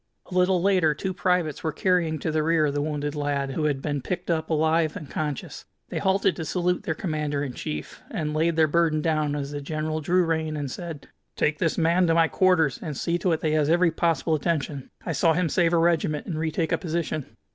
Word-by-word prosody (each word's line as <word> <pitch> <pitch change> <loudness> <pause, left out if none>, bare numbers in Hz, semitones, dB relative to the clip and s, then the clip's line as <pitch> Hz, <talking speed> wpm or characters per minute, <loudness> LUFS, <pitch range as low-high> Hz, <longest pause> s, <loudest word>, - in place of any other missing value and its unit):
A - - -5
little 180 0 +3
later 180 -5 +3
two 190 +5 -3
privates 180 -4 0
were 160 - 0
carrying 170 -1 +1
to 155 +2 -2
the 155 0 +1
rear 155 -2 +2
the 145 0 -1
wounded 145 -1 -2
lad, 145 -2 -1
who 150 +3 -1
had 140 -3 -1
been 145 -2 -1
picked 175 +5 -3
up 160 -1 -1
alive 160 0 +2
and 150 - -8
conscious. 150 -1 -4 0.2
They - - -3
halted 190 -2 +2
to 160 - -3
salute 180 +2 0
their 175 -6 -2
Commander 150 -4 -2
in 135 -3 -4
chief, 75 -9 -6
and 150 -1 -3
laid 165 +2 +1
their 160 -1 +5
burden 155 -1 +2
down 155 -3 +1
as 140 -1 -4
the 145 0 -4
general 155 +2 -3
drew 180 +4 +2
rein 160 -1 -1
and 140 -3 -3
said: 165 -3 -7 0.3
"Take 150 0 0
this 165 -3 0
man 170 +2 +3
to 165 - +3
my 165 -1 +5
quarters, 165 -3 +2
and 150 -5 -5
see 170 +1 -1
to 180 +1 +1
it 160 - 0
that - - 0
he - - 0
has 155 -1 +2
every 175 +1 +4
possible 165 -1 +1
attention. 150 -3 -1 0.2
I 175 - -2
saw 160 +2 +3
him 170 0 +1
save 170 +2 +2
a 170 - +3
regiment 165 -3 +1
and 160 -4 -4
retake 160 +1 -1
a - - +1
position." 160 -4 -3
160 Hz, 230 wpm, -25 LUFS, 150-170 Hz, 0.3 s, their